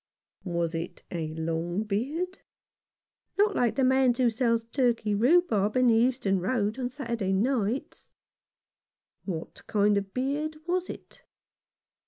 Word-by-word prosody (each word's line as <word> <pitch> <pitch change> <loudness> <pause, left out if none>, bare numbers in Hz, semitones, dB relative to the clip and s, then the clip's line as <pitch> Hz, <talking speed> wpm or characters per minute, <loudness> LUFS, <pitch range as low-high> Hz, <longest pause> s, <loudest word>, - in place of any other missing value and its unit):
" - - -48
Was 170 -2 -1
it 165 +2 -5
a 165 -3 -2
long 165 +4 -2
beard? 285 - -2 0.3
" - - -67
" - - -52
Not 410 +1 +5
long 410 - -5
like 240 -2 +2
the 270 - +1
man's 260 -1 +4
who 250 -3 +3
sells 230 0 +1
turkey 230 -3 0
rhubarb 225 - +3
in 255 - +4
the - - +5
Euston 230 -5 +2
Road 215 +3 -1
on 250 -1 -1
Saturday 235 -7 -3
nights." 230 +3 -1 0.6
" - - -53
What 170 -4 -5
kind 205 -1 +3
of 200 - 0
a - - -29
beard 285 +8 -2
was 360 +1 -1
it - - -10
230 Hz, 160 wpm, -28 LUFS, 200-265 Hz, 0.6 s, Not